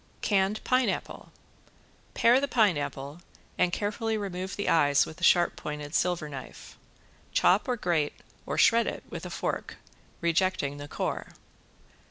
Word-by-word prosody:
~CANNED 200 +1 +1
PINEAPPLE~ 255 0 -1 0.8
Pare 240 +3 +5
the 280 - -1
pineapple 165 - 0 0.4
and 180 -1 +3
carefully 215 +3 -1
remove 190 -2 -4
the 205 - -3
eyes 145 -3 +4
with 160 +2 -11
a - - -7
sharp 175 0 +4
pointed 150 0 -6
silver 175 -3 0
knife. 135 -3 -10 0.6
Chop 190 +7 +3
or 250 -1 0
grate 165 -7 -1 0.3
or - - -2
shred 230 0 +5
it - - -4
with - - -6
a - - -8
fork, - - -3 0.4
rejecting 170 -4 0
the 145 0 -8
core. - - -4
180 Hz, 140 wpm, -28 LUFS, 150-210 Hz, 0.8 s, Pare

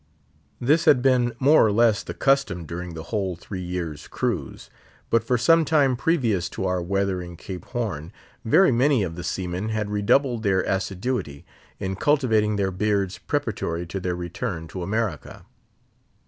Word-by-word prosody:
This 155 +7 +2
had 130 -6 +5
been 125 -3 +3
more 145 +5 +5
or 110 - +3
less 110 0 +3
the - - -7
custom 135 -11 +1
during 85 +1 -6
the 80 - -6
whole 95 -4 -1
three 90 +2 -7
years' 85 -4 -5
cruise; - - -3 0.4
but 115 - +3
for 125 - +1
some 165 +8 +4
time 145 -4 +3
previous 120 - 0
to 95 - -4
our 90 -1 0
weathering 90 -1 -2
Cape 90 +1 -8
Horn, 95 - -4 0.3
very 135 +9 +5
many 130 -1 +3
of 85 -3 -3
the 90 - -6
seamen 90 +3 -3
had 105 -2 -2
redoubled 120 +4 +2
their 95 -3 +2
assiduity 95 - -3 0.3
in 95 0 -3
cultivating 110 -5 +2
their 100 -2 0
beards 100 -1 -1
preparatory 85 +1 -2
to 85 +3 -5
their 90 -1 -2
return 85 -2 -4
to 95 - -6
America. 100 -3 -3
100 Hz, 160 wpm, -24 LUFS, 90-120 Hz, 0.4 s, had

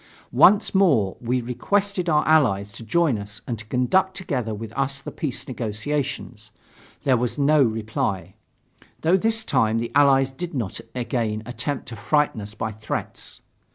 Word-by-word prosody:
Once 205 +1 +5
more 140 - +3
we 125 +1 -1
requested 195 +9 0
our 150 -1 +2
Allies 110 -11 +3
to - - -11
join 140 0 +1
us 100 +1 -9
and 115 -3 -4
to 110 - -10
conduct 185 - +1
together 130 - -2
with 110 +1 -6
us 135 0 -2
the - - -8
peace 140 -6 -2
negotiations. 120 -1 -3 0.5
There 130 -2 +3
was 120 +3 -2
no 145 +1 +4
reply, 110 -6 -1 0.7
though 165 +3 +4
this 225 +3 +1
time 115 - +1
the 115 +1 -3
Allies 135 -2 +4
did 170 +4 -6
not 115 -7 -3
again 115 -4 -2
attempt 135 +3 -4
to 115 - -7
frighten 150 0 +1
us 105 +1 -8
by 110 0 -3
threats. 105 0 -6
125 Hz, 155 wpm, -23 LUFS, 110-150 Hz, 0.7 s, Once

